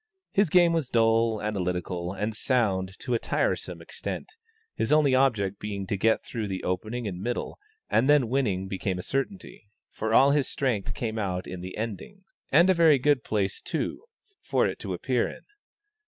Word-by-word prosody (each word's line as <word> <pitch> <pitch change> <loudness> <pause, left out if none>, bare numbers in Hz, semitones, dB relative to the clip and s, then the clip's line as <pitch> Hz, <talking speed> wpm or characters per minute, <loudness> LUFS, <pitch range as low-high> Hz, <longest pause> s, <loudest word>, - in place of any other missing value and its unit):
His 200 -3 +3
game 175 0 +5
was 160 -6 -1
dull, 115 -1 +2
analytical, 90 -3 -2
and 105 +3 -3
sound 95 -7 0
to 125 - -2
a 115 - +2
tiresome - - -1
extent, - - -6 0.4
his - - -2
only 150 -3 +4
object 110 -7 +2
being 100 -2 -4
to 100 - -2
get 110 +3 +2
through 110 -4 -4
the 95 -1 -4
opening 110 +6 -2
and 90 -2 -5
middle, 120 +4 -3 0.3
and 125 +5 +2
then 145 -5 +5
winning 110 -7 0
became 95 -1 -2
a 90 - -5
certainty; 135 - -4 0.2
for 110 +1 -3
all 135 +5 +6
his 145 -2 +2
strength 120 -8 -1
came 110 -2 -3
out 95 -3 -2
in 90 -1 -7
the 95 +1 -7
endings, 115 - -6 0.3
and 170 +6 +6
a 190 - +5
very 165 -4 +5
good 140 0 +2
place, 100 -3 -1
too, 190 - -3 0.4
for - - +1
it - - -2
to - - -4
appear - - 0
in. - - -11
110 Hz, 180 wpm, -27 LUFS, 95-135 Hz, 0.4 s, all